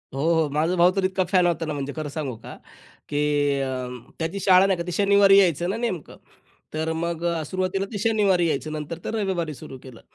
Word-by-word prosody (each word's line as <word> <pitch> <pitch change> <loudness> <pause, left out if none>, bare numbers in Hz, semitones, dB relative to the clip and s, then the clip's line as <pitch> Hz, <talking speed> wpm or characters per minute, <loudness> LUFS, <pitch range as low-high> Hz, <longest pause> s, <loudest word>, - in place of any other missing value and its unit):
हो, 135 - -2 0.2
हो. 150 - -3
माझा 155 +5 0
भाऊ 175 0 +5
तर 195 0 -1
इतका 185 0 0
फॅन 180 0 +3
होता 170 -1 -1
ना 155 - -3
म्हणजे 140 -1 -4
खरं 155 -2 -4
सांगू 140 -4 -4
का, - - -11 0.5
की 145 -1 +1
अ, 130 -2 -3 0.3
त्याची 165 +4 -3
शाळा 185 0 +5
नाही 195 -2 +1
का 170 - -3
ती - - -3
शनिवारी 200 +1 +5
यायचं 175 -2 +2
ना 205 - -2
नेमकं 225 -10 -4 0.6
तर 160 +1 -2
मग 170 0 -3 0.2
सुरुवातीला 185 +3 -2
ते - - -2
शनिवारी 200 -5 +2
यायचं 155 0 -2
नंतर 155 +2 -5
तर - - -3
रविवारी 185 -7 -2
सुरू 135 -1 -10
केलं. 130 -3 -12
170 Hz, 205 wpm, -24 LUFS, 150-190 Hz, 0.6 s, भाऊ